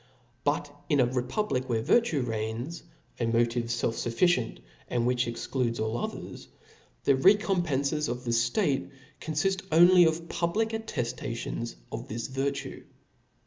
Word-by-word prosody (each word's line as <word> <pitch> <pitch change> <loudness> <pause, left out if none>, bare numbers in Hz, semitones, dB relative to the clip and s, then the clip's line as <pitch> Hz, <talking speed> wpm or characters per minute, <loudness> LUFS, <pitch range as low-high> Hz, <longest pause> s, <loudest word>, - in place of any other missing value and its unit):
But 145 0 -1
in 145 - +3
a 125 - +6
republic 130 - -1
where 115 -2 0
virtue 200 - +3
reigns, 115 +6 -3 0.4
a 120 - +1
motive 115 +1 +1
felf 115 -1 -1 0.2
fufRcient, 125 -1 +2 0.3
and 120 -1 0
which 125 0 +1
excludes 120 0 -2
all 110 +1 -1
others, - - -5 0.6
the 140 - +4
recompcnces 155 -4 +2
of 125 +1 -4
the 120 - -2
ftate 135 - +1 0.3
confift 190 +5 0
only 175 +2 +7
of 165 +1 0
public 175 +8 0
atteftations 120 - -4 0.2
of - - -5
this 115 +2 -4
virtue. 135 +2 -3
130 Hz, 130 wpm, -28 LUFS, 120-170 Hz, 0.6 s, only